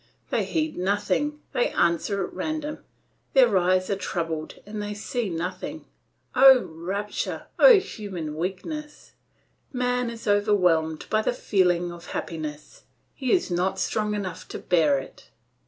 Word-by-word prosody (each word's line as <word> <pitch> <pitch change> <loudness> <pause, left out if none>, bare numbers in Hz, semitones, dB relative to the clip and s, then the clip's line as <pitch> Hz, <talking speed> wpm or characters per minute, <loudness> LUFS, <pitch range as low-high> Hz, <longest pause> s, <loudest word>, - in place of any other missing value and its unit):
They - - +1
heed 315 -1 -1
nothing, 205 +10 0
they 245 - +2
answer 175 +4 +1
at - - -11
random; 310 -1 -3 0.5
their 245 -6 +5
eyes 185 0 +3
are - - +2
troubled 165 -4 -3
and 210 +1 -5
they 205 0 -4
see 220 +1 -3
nothing. 180 - -4 0.5
Oh, 265 -1 +8
rapture! 190 +6 -4
Oh, - - +9
human 185 - -6
weakness! 195 - -5 0.6
Man 250 -1 0
is 230 -1 -8
overwhelmed 180 -7 +2
by 215 - +3
the 220 - 0
feeling 180 -6 +1
of 175 0 -10
happiness, 155 -3 -6 0.3
he 260 -3 -2
is 355 - +2
not 180 +2 0
strong 210 +2 -1
enough 185 -4 -5
to - - -6
bear 160 -6 +3
it. 135 - -9
200 Hz, 140 wpm, -25 LUFS, 175-245 Hz, 0.6 s, Oh